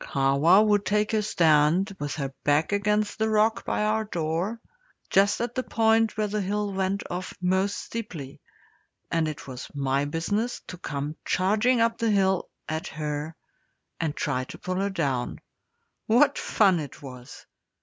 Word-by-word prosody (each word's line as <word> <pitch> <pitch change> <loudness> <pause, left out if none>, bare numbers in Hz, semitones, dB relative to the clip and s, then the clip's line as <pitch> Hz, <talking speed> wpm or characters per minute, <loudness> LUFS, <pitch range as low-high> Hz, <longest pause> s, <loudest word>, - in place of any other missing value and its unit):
Kahwa 140 +9 +4
would 205 -1 +3
take 210 +1 +1
her 220 -1 +2
stand 170 0 +3
with 145 -1 -3
her 135 -3 -4
back 145 +4 +2
against 210 +1 0
the 220 0 +1
rock 220 +1 +2
by - - 0
our 215 +1 +1
door, 175 +3 -2 0.5
just 200 +1 +4
at 240 0 -2
the 255 - -1
point 225 -2 +2
where 215 - +1
the 210 0 -2
hill 205 +1 -2
went 190 +1 -1
off 180 +1 -5
most 190 +2 +1
steeply, 175 -12 -7 0.7
and 165 -1 +1
it 155 0 -6
was 130 -1 -7
my 140 0 0
business 205 +10 -2
to 180 - -8
come 145 -1 -4
charging 215 +6 +2
up 230 0 +1
the 230 - +1
hill 190 -3 +2 0.2
at 155 +1 -3
her 150 +1 -4 0.6
and 160 -3 -1
try 130 -3 -1
to - - -10
pull 185 0 -3
her 200 +1 0
down. 140 -10 -2 0.7
What 270 +6 +4
fun 190 -5 +3
it 145 -1 -8
was! 125 -2 -10
190 Hz, 160 wpm, -26 LUFS, 150-210 Hz, 0.7 s, Kahwa